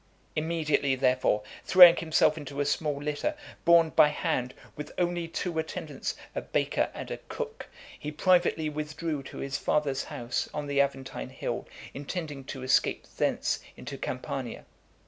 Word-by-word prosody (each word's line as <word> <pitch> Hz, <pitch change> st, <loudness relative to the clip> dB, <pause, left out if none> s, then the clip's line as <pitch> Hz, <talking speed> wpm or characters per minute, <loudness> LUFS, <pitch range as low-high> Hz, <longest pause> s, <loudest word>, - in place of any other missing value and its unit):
Immediately, 155 Hz, -4 st, +1 dB
therefore, 130 Hz, -5 st, +2 dB, 0.2 s
throwing 180 Hz, -2 st, +10 dB
himself 160 Hz, -2 st, +3 dB
into 145 Hz, -2 st, -7 dB
a 145 Hz, -, +2 dB
small 145 Hz, 0 st, 0 dB
litter, 150 Hz, -, -2 dB, 0.3 s
borne 170 Hz, -2 st, +6 dB
by 150 Hz, -, +7 dB
hand, 150 Hz, -4 st, -1 dB, 0.2 s
with 150 Hz, -, -7 dB
only 175 Hz, -1 st, 0 dB
two 165 Hz, 0 st, -2 dB
attendants, 160 Hz, -, -4 dB, 0.2 s
a -, -, -2 dB
baker -, -, 0 dB
and -, -, -6 dB
a -, -, -4 dB
cook, 460 Hz, -2 st, -5 dB, 0.3 s
he 150 Hz, -, -5 dB
privately 175 Hz, -1 st, +3 dB
withdrew 150 Hz, 0 st, -3 dB
to 135 Hz, -, -10 dB
his 135 Hz, +1 st, -3 dB
father's 140 Hz, -3 st, 0 dB
house, 120 Hz, +1 st, -3 dB
on 150 Hz, -1 st, -2 dB
the 140 Hz, -1 st, +2 dB
Aventine 135 Hz, -, -3 dB
hill, -, -, -4 dB, 0.3 s
intending 145 Hz, -1 st, -5 dB
to 135 Hz, -1 st, -6 dB
escape 130 Hz, -, +2 dB
thence -, -, +1 dB, 0.2 s
into -, -, -7 dB
Campania. -, -, -5 dB
150 Hz, 145 wpm, -29 LUFS, 140-165 Hz, 0.3 s, throwing